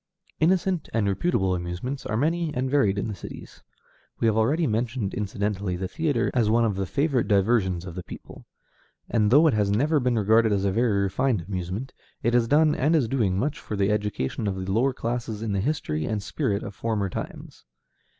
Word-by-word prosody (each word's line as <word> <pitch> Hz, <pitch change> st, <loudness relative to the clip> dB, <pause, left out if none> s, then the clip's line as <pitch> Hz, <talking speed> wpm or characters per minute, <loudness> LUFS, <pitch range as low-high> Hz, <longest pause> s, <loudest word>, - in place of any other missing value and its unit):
Innocent 180 Hz, +1 st, +1 dB
and 110 Hz, -3 st, +2 dB
reputable 95 Hz, -, +1 dB
amusements 90 Hz, +10 st, -4 dB
are 110 Hz, -, -1 dB
many 165 Hz, +4 st, 0 dB
and 130 Hz, +1 st, -1 dB
varied 105 Hz, -9 st, +3 dB
in 100 Hz, -, -1 dB
the 110 Hz, -, -4 dB
cities. 95 Hz, -, -10 dB, 0.6 s
We -, -, 0 dB
have 110 Hz, -2 st, +3 dB
already 140 Hz, +10 st, +2 dB
mentioned 115 Hz, -2 st, -1 dB
incidentally 100 Hz, -2 st, -2 dB
the 95 Hz, +1 st, -3 dB
theatre 150 Hz, -, 0 dB
as 115 Hz, -4 st, +2 dB
one 115 Hz, +1 st, +3 dB
of 110 Hz, -, +1 dB
the 95 Hz, 0 st, -2 dB
favorite 140 Hz, -, 0 dB
diversions 100 Hz, -3 st, +2 dB
of 90 Hz, -, -7 dB
the 90 Hz, -, -5 dB
people; -, -, -11 dB, 0.6 s
and 105 Hz, -3 st, +2 dB
though 145 Hz, +7 st, +6 dB
it 155 Hz, -, +4 dB
has 105 Hz, -2 st, +1 dB
never 145 Hz, +9 st, +2 dB
been 125 Hz, -2 st, +1 dB
regarded 110 Hz, +1 st, +4 dB
as 100 Hz, -1 st, 0 dB
a 100 Hz, -, +2 dB
very 105 Hz, -2 st, +2 dB
refined 105 Hz, -1 st, 0 dB
amusement, 95 Hz, +6 st, -4 dB, 0.3 s
it 120 Hz, -, +1 dB
has 120 Hz, -1 st, +3 dB
done 150 Hz, +3 st, +4 dB
and 155 Hz, +5 st, +2 dB
is 140 Hz, -7 st, +2 dB
doing 110 Hz, -7 st, 0 dB
much 140 Hz, +8 st, -1 dB
for 105 Hz, -, -5 dB
the 100 Hz, 0 st, +1 dB
education 105 Hz, -, -2 dB
of 95 Hz, -, -1 dB
the 95 Hz, 0 st, -4 dB
lower 120 Hz, +7 st, +2 dB
classes 115 Hz, -3 st, -4 dB
in 110 Hz, -, -2 dB
the 100 Hz, -1 st, 0 dB
history 95 Hz, -, -1 dB
and 105 Hz, +1 st, -2 dB
spirit 100 Hz, 0 st, -1 dB
of -, -, -6 dB
former 105 Hz, -1 st, -1 dB
times. 90 Hz, -, -8 dB
110 Hz, 200 wpm, -25 LUFS, 100-130 Hz, 0.6 s, though